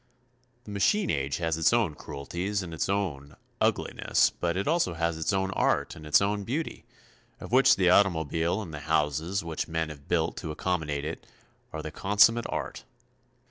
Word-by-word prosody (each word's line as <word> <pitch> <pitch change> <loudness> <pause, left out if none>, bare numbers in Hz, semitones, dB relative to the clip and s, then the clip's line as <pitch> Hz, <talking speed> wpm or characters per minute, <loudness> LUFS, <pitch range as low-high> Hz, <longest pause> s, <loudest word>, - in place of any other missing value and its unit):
The 105 - -10
machine 190 - +2
age 70 0 -1
has 80 -2 -1
its 80 0 +4
own 115 -9 +2
cruelties 90 +9 -4
and 85 -2 -7
its 80 - -2
own, 85 -9 -2 0.3
ugliness, - - +2
but 85 +1 -2
it 100 - -2
also 155 - +1
has 85 0 0
its 80 0 -1
own 95 0 0
art - - 0
and 75 - -10
its 75 +5 +5
own 100 0 -1
beauty, 145 +10 -4 0.5
of - - -9
which 130 +2 +6
the 90 -2 +3
automobile 85 0 +2
and 85 -5 -9
the 75 - -5
houses 80 +5 0
which 80 -2 -3
men 80 -1 -2
have 70 -2 -11
built - - 0
to - - -5
accommodate 75 -3 -2
it, 80 - -6 0.4
are - - -5
the - - -5
consummate 110 +4 +3
art. - - -4
85 Hz, 180 wpm, -28 LUFS, 80-100 Hz, 0.5 s, which